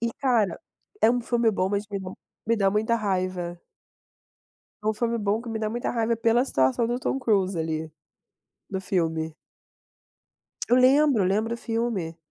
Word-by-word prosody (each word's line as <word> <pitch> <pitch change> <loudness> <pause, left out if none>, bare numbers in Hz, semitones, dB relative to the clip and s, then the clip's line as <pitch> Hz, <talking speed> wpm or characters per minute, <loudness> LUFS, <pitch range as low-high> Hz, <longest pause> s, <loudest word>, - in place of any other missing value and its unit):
E, 235 0 -1
cara, 235 - +1 0.4
é 225 - +6
um 245 0 +1
filme 235 -1 +2
bom, 190 -3 0
mas 200 +1 -1
me 200 - -3
dá 185 -1 -6 0.4
me 230 0 +2
dá 195 -2 +3
muita 220 +3 +1
raiva. 185 -4 -2 1.2
É - - -7
um 215 - +3
filme 235 +2 -1
bom 210 0 0
que 240 - -9
me 225 -1 -3
dá 215 0 -1
muita 240 +1 -2
raiva 230 -1 0
pela 230 +2 +3
situação 130 - +1
do 240 - -1
Tom 260 - -1
Cruise, 195 -7 +1
ali, 160 -1 -2 0.8
no 190 -1 -3
filme. 160 -4 -1 1.3
Eu 245 - +5
lembro 265 -2 +5
eu - - +2
lembro 220 +4 0
o - - -5
filme. 225 -8 -2
215 Hz, 175 wpm, -25 LUFS, 185-235 Hz, 1.3 s, é